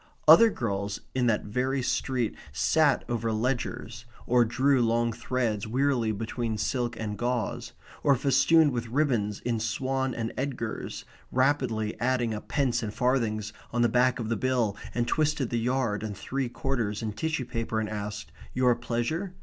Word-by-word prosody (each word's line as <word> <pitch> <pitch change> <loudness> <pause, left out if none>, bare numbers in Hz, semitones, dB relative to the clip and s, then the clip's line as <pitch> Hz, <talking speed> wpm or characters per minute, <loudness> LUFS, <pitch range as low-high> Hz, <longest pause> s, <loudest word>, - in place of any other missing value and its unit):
Other 230 0 +9
girls 100 - -3
in 125 -1 +1
that 110 -2 +2
very 130 +5 -1
street 125 -3 -1 0.2
sat 145 - +3
over 115 -2 -1
ledgers, 115 0 -2 0.2
or 125 0 +4
drew 130 +3 +2
long 115 0 +2
threads 115 -3 -1
wearily 125 -1 +1
between 110 +1 -3
silk 120 +2 -1
and 105 -2 -3
gauze; 120 -1 -2 0.3
or, 140 - +4
festooned 140 +4 +4
with 120 -2 -3
ribbons 115 -6 0
in 120 -2 -1
Swan 130 +3 -1
and 115 -1 -3
Edgars, 125 -5 -4 0.3
rapidly 130 -5 +1
added 120 -2 +1
up 105 - -7
pence 135 -5 +1
and 110 -3 -3
farthings 110 -4 0 0.2
on 120 +1 +1
the 120 - +4
back 125 +2 +3
of 115 -3 -4
the 115 - +1
bill 120 -3 0 0.2
and 120 -1 0
twisted 150 -5 0
the 120 - +1
yard 120 -3 0
and 105 -3 -5
three 135 +1 -3
quarters 120 -5 -2
in 110 -1 -2
tissue 155 +3 -2
paper 115 -1 -2
and 110 - -1
asked 105 0 -5 0.2
"Your 125 -1 +4
pleasure?" 120 - -2
120 Hz, 160 wpm, -28 LUFS, 110-130 Hz, 0.3 s, Other